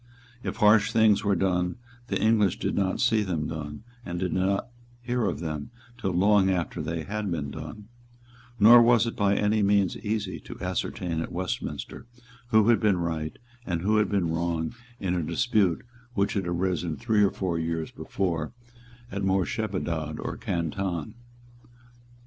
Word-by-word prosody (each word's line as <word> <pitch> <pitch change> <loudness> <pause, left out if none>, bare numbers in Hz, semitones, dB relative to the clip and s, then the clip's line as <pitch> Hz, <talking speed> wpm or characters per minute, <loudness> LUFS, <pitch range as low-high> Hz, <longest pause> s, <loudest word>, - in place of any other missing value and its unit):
If - - -4
harsh 105 -1 +5
things 105 -2 +4
were 100 -1 +2
done, 90 -1 0 0.3
the - - -1
English 110 -4 +3
did - - -2
not 95 -2 0
see 110 -1 +3
them 85 -7 -2
done, 75 +2 -6 0.2
and 90 -4 -5
did 90 -3 -1
not 100 +5 0 0.3
hear 120 -1 -1
of - - -3
them 75 -1 -4 0.3
till 95 - -1
long 95 +2 +4
after 90 -3 -1
they 80 0 -3
had 105 +2 -3
been 75 -5 -3
done; 80 +7 -8 0.7
nor 115 +3 +9
was 120 -1 +5
it 115 - -3
by 100 -1 +2
any 105 +1 +2
means 100 -2 +3
easy 105 -3 -3
to - - -10
ascertain 85 -3 -2
at - - -5
Westminster 90 +5 -4 0.4
who 110 -1 +4
had 120 - +5
been 105 -4 +3
right 80 -2 -3 0.3
and 85 -5 -2
who 110 +2 +3
had 105 - +2
been 90 -5 0
wrong 85 -1 -1 0.3
in 90 -2 -1
a 90 - 0
dispute 100 0 +1 0.3
which 100 0 +1
had 95 -4 -1
arisen 85 -2 -1
three 110 -3 +2
or 100 - +5
four 90 -4 -2
years 80 -1 -2
before 85 -4 -2 0.6
at 100 - -3
Moorshedabad 95 -5 -1
or - - -4
Canton. 85 +2 -3
95 Hz, 160 wpm, -27 LUFS, 85-105 Hz, 0.7 s, nor